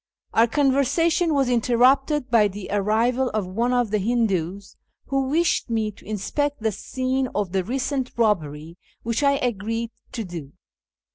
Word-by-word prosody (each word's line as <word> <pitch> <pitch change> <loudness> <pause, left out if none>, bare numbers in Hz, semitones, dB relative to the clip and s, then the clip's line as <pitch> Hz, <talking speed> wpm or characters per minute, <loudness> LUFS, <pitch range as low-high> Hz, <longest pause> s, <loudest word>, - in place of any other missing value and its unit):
Our 230 +1 +5
con 275 +3 +2
versation 330 +5 +2
was 275 -2 +2
interrupted 255 +3 +2
by 220 -3 +5
the 200 0 -8
arrival 225 +6 +1
of 210 -3 0
one 230 +7 -1
of 245 -4 +1
the 215 - +1
Hindoos, 200 -4 -1 0.3
who 270 -1 0
wished 330 -2 +1
me 220 -2 0
to 205 - -19
inspect 285 +8 -2
the 220 - +2
scene 260 +5 -2
of 205 -4 -1
the 190 -1 0
recent 260 +4 -2
robbery, 165 -7 -1 0.2
which 230 +3 -1
I 280 -1 +4
agreed 230 -2 -2 0.2
to 230 - -3
do. 170 -7 -8
230 Hz, 155 wpm, -23 LUFS, 205-265 Hz, 0.3 s, Our